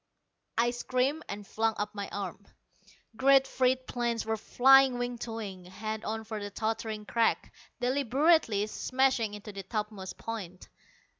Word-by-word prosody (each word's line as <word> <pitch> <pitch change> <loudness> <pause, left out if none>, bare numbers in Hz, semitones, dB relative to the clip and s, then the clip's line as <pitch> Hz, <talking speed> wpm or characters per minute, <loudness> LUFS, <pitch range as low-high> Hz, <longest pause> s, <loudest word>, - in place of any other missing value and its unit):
I 240 +1 +3
screamed 255 +5 -1
and 205 +1 -6
flung 225 +2 0
up 210 +1 -3
my 200 -1 -5
arm. 200 0 -6 0.7
Great 270 +2 +5
freight 255 0 +1
planes 235 -2 -1
were 220 0 0
flying 265 +3 +5
wing 245 -1 -3
to 230 - -5
wing, 195 -5 -6
head 215 +4 -5
on 220 +1 -3
for 220 -1 -5
the 205 - -4
tottering 220 0 -3
crag 230 +1 +1 0.3
deliberately 265 -3 +3
smashing 250 -1 +1
into 210 +1 -9
the 195 -1 -6
topmost 210 -1 -5
point. 190 -6 -7
225 Hz, 145 wpm, -30 LUFS, 210-255 Hz, 0.7 s, Great